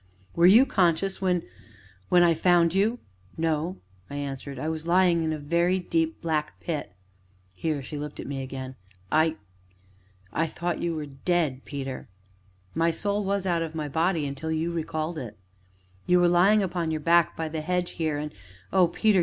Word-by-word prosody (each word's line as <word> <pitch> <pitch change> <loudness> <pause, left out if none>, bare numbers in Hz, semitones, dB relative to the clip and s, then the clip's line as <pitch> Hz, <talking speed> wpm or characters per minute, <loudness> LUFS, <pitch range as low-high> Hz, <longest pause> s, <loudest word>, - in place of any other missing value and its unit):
"Were 170 +1 +6
you 225 +8 +8
conscious 190 -2 +1
when 180 -2 +1 0.7
when 175 -1 +6
I 170 -1 +5
found 170 0 +3
you?" 210 +5 +2 0.4
"No," 160 +2 -1 0.3
I 140 - -7
answered; 140 -1 -5
"I 155 - -3
was 160 0 -3
lying 175 -1 +4
in 160 - 0
a 155 - -2
very 170 +5 +1
deep, 325 - -1
black, 155 -2 -1
pit." 155 - -4 0.6
Here 150 - -2
she 150 +2 -6
looked 150 0 -6
at - - -5
me 135 -1 -4
again. 130 0 -6 0.4
"I 155 +1 +3 1.0
I 165 +2 +1
thought 175 +2 -3
you 170 -1 -1
were 155 -1 -4
dead, 140 -1 -1
Peter." 135 -5 -6 0.6
"My 165 +1 +2
soul 205 +5 -1
was 200 0 -1
out 170 -2 +1
of 165 -1 -4
my 155 -2 -2
body 160 +2 +1
until 140 +3 -4
you 160 +2 -1
recalled 160 0 -3
it." 110 -6 -8 0.7
"You 180 0 +5
were 175 - +5
lying 190 +5 +5
upon 175 -3 -2
your 160 -1 -1
back, 170 +2 +3
by 160 - -2
the 155 0 -4
hedge 180 +2 -1
here, 160 -3 -1
and 150 +1 -5 0.4
oh, 185 -2 +5
Peter! 205 +3 +2
165 Hz, 180 wpm, -26 LUFS, 150-180 Hz, 1.0 s, you